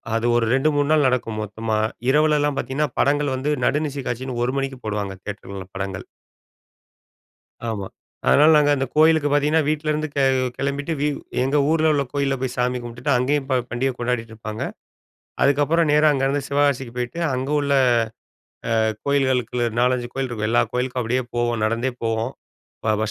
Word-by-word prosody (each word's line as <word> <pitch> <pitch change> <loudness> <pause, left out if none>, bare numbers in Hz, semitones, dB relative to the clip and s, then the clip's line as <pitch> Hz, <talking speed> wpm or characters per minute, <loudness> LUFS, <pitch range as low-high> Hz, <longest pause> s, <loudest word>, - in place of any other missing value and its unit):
அது 115 +1 0
ஒரு 115 - +2
2, 135 +4 +3
3 145 0 +1
நாள் 155 -2 +4
நடக்கும் 115 -4 -1
மொத்தமா. 110 +1 -3 0.3
இரவுல 150 +2 +4
எல்லா 145 0 +2
பார்த்தீங்கன்னா! 140 +2 -1
படங்கள் 145 -1 +2
வந்து 135 +3 -1
நடுநிசி 145 -2 -1
காட்சினு, 125 0 -4
1 130 - -1
மணிக்கு 135 -1 -4
போடுவாங்க! 105 -2 -3
தியேட்டர்ல 100 -2 -7
படங்கள். 95 -1 -4 1.6
ஆமா. 105 -4 -3 0.4
அதனால 150 +3 +6
நாங்க, 145 -1 +4
அந்த 135 0 -1
கோயிலுக்கு 155 -1 +5
பார்த்திங்கன்னா! 150 +2 +3
வீட்லருந்து 155 0 -1
கி 140 - +1 0.4
கிளம்பிட்டு 140 +3 -2
வி 150 - +2 0.3
எங்க 135 +3 +1
ஊர்ல 160 -1 +3
உள்ள 145 -2 +2
கோயில்ல 140 -1 0
போய் 130 -2 -2
சாமி 125 0 0
கும்டுட்டு, 120 +4 -4
அங்கயும் 135 +3 0
போ 130 - +3
பண்டிகை 130 +2 0
கொண்டாடிட்டுருப்பாங்க! 115 -3 -4 0.8
அதுக்கப்புறம் 145 +4 +3
நேரா 150 +1 +5
அங்கருந்து 135 +1 0
சிவகாசிக்கு 140 -4 +1
போய்ட்டு, 125 +6 -4
அங்க 130 +2 -2
உள்ள 140 -1 0 1.1
அ 110 0 +2
கோயில்களுக்குள்ள, 130 -4 +1
4,5 125 0 +1
கோயில் 135 -1 -2
இருக்கும். 110 -3 -3
எல்லா 120 - +4
கோயிலுக்கும் 125 0 -1
அப்படியே 125 +3 0
போவோம் 120 -2 0
நடந்தே 115 +4 0
போவோம். 115 +2 -1 0.5
ப 110 -1 +2
பஸ் 110 0 -1
130 Hz, 155 wpm, -22 LUFS, 120-145 Hz, 1.6 s, அதனால